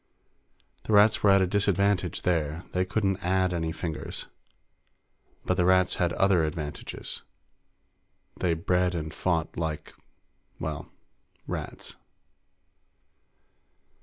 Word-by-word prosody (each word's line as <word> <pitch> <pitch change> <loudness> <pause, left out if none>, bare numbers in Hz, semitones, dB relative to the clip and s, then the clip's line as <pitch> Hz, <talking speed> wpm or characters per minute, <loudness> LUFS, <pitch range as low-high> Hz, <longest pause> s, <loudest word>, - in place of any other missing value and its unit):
The 110 - 0
Rats 105 +1 +6
were 105 - +5
at 95 -1 +6
a - - +3
disadvantage 100 -1 +1
there; 80 -2 0
they 90 0 +1
couldn't 100 -1 0
add 95 0 +2
any 80 -2 -1
fingers. 80 -1 -4 1.2
But 90 - +1
the 90 - +3
Rats 95 0 +4
had 90 -3 +1
other 95 -4 +3
advantages 75 -1 -4 1.1
they 85 -2 +1
bred 90 +2 +1
and 80 -1 -4
fought 85 -4 -1
like, 80 -2 -3 0.7
well, 75 -2 -4
like - - -25 0.6
rats. - - -5
90 Hz, 110 wpm, -27 LUFS, 80-95 Hz, 1.2 s, Rats